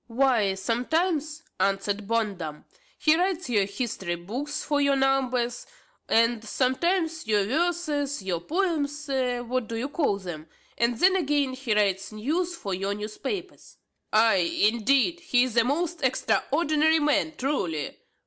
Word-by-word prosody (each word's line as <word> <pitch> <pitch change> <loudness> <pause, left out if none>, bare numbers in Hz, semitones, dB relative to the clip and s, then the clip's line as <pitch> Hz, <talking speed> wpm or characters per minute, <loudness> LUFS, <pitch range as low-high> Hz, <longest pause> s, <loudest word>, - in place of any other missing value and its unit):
"Why, 235 -5 +2
sometimes," 305 - -1 0.2
answered 195 +1 0
Bondum, 200 -9 -2 0.3
"he 310 0 +4
writes 360 -5 -1
your 205 -4 +3
history 200 -4 -3
books 250 - -5
for 290 -1 0
your 280 -1 +3
numbers, 255 -3 0 0.4
and 230 0 +3
sometimes 320 - 0
your 210 -2 +2
verses, 295 - -1
your 180 -3 -1
poems, 300 - -1
what 250 -2 -1
do 230 - -5
you 245 +5 -3
call 285 - 0
them? 170 -5 -8 0.3
and 235 0 +1
then 375 +8 +4
again 290 -6 +1
he 255 -4 -1
writes 195 -1 +1
news 320 +12 -2
for 200 - -5
your 195 +2 -2
newspapers." 265 - -6 0.3
"Ay, 220 -1 +5 0.3
indeed! 275 +9 +2
he 250 -8 +2
is 255 -3 -3
a 235 - +5
most 330 +6 -1
extraordinary 295 - +2
man, 300 +1 +1
truly! 180 - -2
255 Hz, 135 wpm, -26 LUFS, 215-305 Hz, 0.4 s, Ay